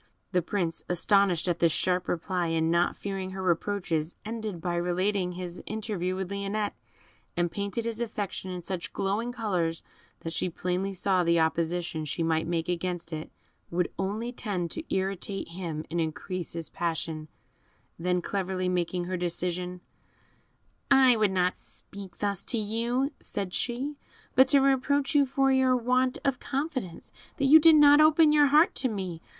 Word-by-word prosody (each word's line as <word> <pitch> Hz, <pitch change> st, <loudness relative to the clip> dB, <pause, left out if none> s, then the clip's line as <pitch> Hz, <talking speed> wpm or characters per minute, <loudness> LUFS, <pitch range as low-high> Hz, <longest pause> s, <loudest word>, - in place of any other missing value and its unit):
The 180 Hz, -2 st, +2 dB
Prince, 170 Hz, -2 st, -2 dB
astonished 185 Hz, 0 st, +3 dB
at 175 Hz, -1 st, 0 dB
this 170 Hz, -1 st, +4 dB
sharp 180 Hz, +2 st, +1 dB
reply, 175 Hz, 0 st, -1 dB
and 165 Hz, 0 st, +1 dB
not 170 Hz, +1 st, +2 dB
fearing 195 Hz, -2 st, -5 dB
her 190 Hz, 0 st, -5 dB
reproaches, 175 Hz, -3 st, -1 dB
ended 215 Hz, -4 st, -4 dB
by 175 Hz, +1 st, -2 dB
relating 180 Hz, +2 st, 0 dB
his 180 Hz, -1 st, -6 dB
interview 205 Hz, -4 st, -2 dB
with 190 Hz, 0 st, -4 dB
Lionette, 200 Hz, +1 st, -2 dB, 0.6 s
and 175 Hz, -1 st, +1 dB
painted 200 Hz, +3 st, -3 dB
his 230 Hz, 0 st, -3 dB
affection 205 Hz, -4 st, -4 dB
in 180 Hz, -1 st, -5 dB
such 180 Hz, 0 st, -5 dB
glowing 210 Hz, +5 st, -1 dB
colours 180 Hz, -9 st, -1 dB, 0.4 s
that 165 Hz, -, -5 dB
she 180 Hz, -, -1 dB
plainly 180 Hz, +3 st, -2 dB
saw 190 Hz, -1 st, +1 dB
the 170 Hz, 0 st, +3 dB
opposition 165 Hz, 0 st, 0 dB
she 155 Hz, +3 st, -2 dB
might 160 Hz, 0 st, +1 dB
make 165 Hz, -1 st, -1 dB
against 175 Hz, -1 st, -3 dB
it 155 Hz, 0 st, -5 dB, 0.4 s
would 175 Hz, 0 st, -1 dB
only 210 Hz, +5 st, -2 dB
tend 190 Hz, -8 st, -3 dB
to 325 Hz, -, -4 dB
irritate 195 Hz, 0 st, -2 dB
him 165 Hz, -3 st, -5 dB
and 170 Hz, 0 st, 0 dB
increase 170 Hz, +3 st, -4 dB
his 165 Hz, -1 st, -5 dB
passion; 160 Hz, -2 st, -3 dB, 0.7 s
then 180 Hz, +1 st, 0 dB
cleverly 190 Hz, -2 st, -2 dB
making 180 Hz, 0 st, -1 dB
her 185 Hz, +1 st, -3 dB
decision, 180 Hz, +1 st, -3 dB, 1.1 s
"I 265 Hz, -3 st, +6 dB
would 215 Hz, -2 st, +3 dB
not 185 Hz, -1 st, 0 dB
speak 195 Hz, -3 st, -12 dB
thus 200 Hz, -2 st, -2 dB
to 240 Hz, -, -1 dB
you," 235 Hz, +6 st, 0 dB
said 195 Hz, -3 st, -5 dB
she, 265 Hz, +4 st, -2 dB, 0.4 s
"but 260 Hz, 0 st, +6 dB
to 280 Hz, 0 st, +5 dB
reproach 275 Hz, +1 st, +2 dB
you 285 Hz, -2 st, +4 dB
for 270 Hz, +1 st, +2 dB
your 260 Hz, -1 st, +4 dB
want 255 Hz, +2 st, +1 dB
of 270 Hz, -3 st, +1 dB
confidence, 270 Hz, -, -4 dB, 0.3 s
that 275 Hz, -, +1 dB
you 305 Hz, +4 st, +9 dB
did 320 Hz, 0 st, +7 dB
not 290 Hz, 0 st, +7 dB
open 310 Hz, 0 st, +6 dB
your 295 Hz, -1 st, +6 dB
heart 305 Hz, +5 st, +5 dB
to 260 Hz, -, 0 dB
me. 185 Hz, -6 st, -4 dB
190 Hz, 165 wpm, -28 LUFS, 175-230 Hz, 1.1 s, you